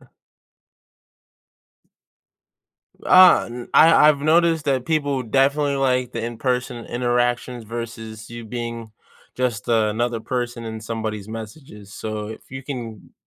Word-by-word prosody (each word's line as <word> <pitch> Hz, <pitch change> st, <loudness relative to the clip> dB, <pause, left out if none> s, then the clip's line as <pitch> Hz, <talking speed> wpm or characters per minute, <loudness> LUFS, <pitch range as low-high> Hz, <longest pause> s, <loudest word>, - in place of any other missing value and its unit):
uh -, -, -20 dB, 3.0 s
Uh, 185 Hz, -1 st, +7 dB
n 120 Hz, 0 st, -8 dB
I 160 Hz, -2 st, +7 dB
I've 150 Hz, -2 st, +4 dB
noticed 160 Hz, +1 st, +3 dB
that 130 Hz, -3 st, +1 dB
people 145 Hz, -4 st, 0 dB
definitely 140 Hz, +4 st, +1 dB
like 125 Hz, -2 st, 0 dB
the 115 Hz, -, -4 dB
in-person 120 Hz, 0 st, -2 dB
interactions 120 Hz, 0 st, -1 dB
versus 115 Hz, -1 st, -7 dB
you 120 Hz, -1 st, -8 dB
being 115 Hz, -1 st, -6 dB, 0.4 s
just 125 Hz, -5 st, -2 dB
another 115 Hz, +1 st, +1 dB
person 120 Hz, -1 st, -4 dB
in 110 Hz, -1 st, -6 dB
somebody's 110 Hz, -2 st, -4 dB
messages, 110 Hz, -2 st, -10 dB
so 110 Hz, -1 st, -5 dB
if 110 Hz, -, -11 dB
you 135 Hz, +1 st, -7 dB
can 120 Hz, -6 st, -7 dB
120 Hz, 120 wpm, -22 LUFS, 110-135 Hz, 3.0 s, Uh